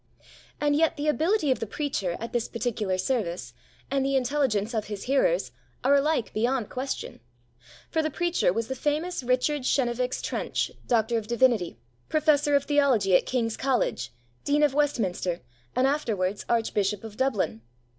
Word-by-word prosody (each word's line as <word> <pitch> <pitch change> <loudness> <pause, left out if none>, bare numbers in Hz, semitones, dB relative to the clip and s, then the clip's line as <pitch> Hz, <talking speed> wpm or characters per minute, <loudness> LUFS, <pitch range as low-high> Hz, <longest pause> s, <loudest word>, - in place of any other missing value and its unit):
And 290 -1 +2
yet 320 +1 +2
the 295 +1 -2
ability 315 +1 +2
of 255 - +1
the 225 - -3
preacher 200 - -2
at 230 +1 -6
this 240 -2 0
particular 220 -5 -2
service, 180 - -2 0.4
and 275 -1 +1
the 275 0 +1
intelligence 250 -5 +1
of 220 -2 -1
his 205 -2 -6
hearers, 390 - +2 0.3
are 270 +2 +4
alike 285 -3 +2
beyond 240 +1 0
question. 260 +2 -4 0.7
For 320 - +2
the 310 - -1
preacher 345 - +1
was 225 +4 -2
the 265 - -2
famous 300 +6 -1
Richard 255 +4 +1
Chenevix 250 -1 0
Trench, - - -2 0.2
D.D., 230 - +2 0.3
Professor 295 -2 +3
of 280 - +3
Theology 265 -11 +3
at - - +3
King's 230 -3 0
College, 245 - 0 0.3
Dean 295 +1 +2
of 290 -2 +3
Westminster, 200 - 0 0.3
and 255 - +3
afterwards 210 -9 0
Archbishop 210 -3 0
of 220 -2 -8
Dublin. 205 - 0
250 Hz, 150 wpm, -27 LUFS, 215-290 Hz, 0.7 s, are